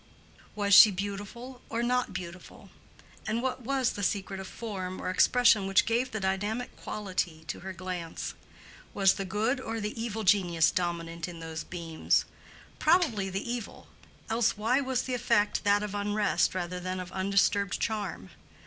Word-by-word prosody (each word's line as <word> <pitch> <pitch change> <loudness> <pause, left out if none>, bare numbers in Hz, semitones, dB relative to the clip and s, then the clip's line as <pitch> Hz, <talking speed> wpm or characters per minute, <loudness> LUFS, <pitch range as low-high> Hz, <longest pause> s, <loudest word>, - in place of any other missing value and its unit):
Was 205 -1 +1
she 210 +2 +11
beautiful 205 +6 -6
or 230 +1 -1
not 250 +1 +1
beautiful? 180 -1 -9 0.6
and 220 +2 0
what 260 +1 -2
was 260 0 0
the 205 - -6
secret 195 -1 -1
of 190 - -6
form 190 -5 -5
or - - -2
expression 220 0 +4
which 195 0 +4
gave 240 +3 +1
the 220 - -4
dynamic 205 +5 -2
quality 180 -6 -3
to - - -4
her 190 +1 -6
glance? 180 -2 -5 0.6
Was 195 -2 +5
the 195 - -4
good 215 +7 0
or 225 -2 -4
the 210 +1 -4
evil 225 -1 -3
genius 175 -5 +4
dominant 170 -1 -2
in 170 -2 -8
those 160 0 -5
beams? 165 -3 0 0.5
Probably 305 - +3
the 195 +4 -4
evil; 240 -2 -5 0.4
else 225 -1 +1
why 235 +6 +2
was 260 -2 -1
the 255 - -4
effect 230 -4 +1
that 205 0 +4
of 210 -1 -4
unrest 205 -1 +1
rather 180 0 -3
than 185 +1 -4
of 180 0 -7
undisturbed 195 0 +1
charm? 205 - -3
200 Hz, 160 wpm, -29 LUFS, 185-230 Hz, 0.6 s, she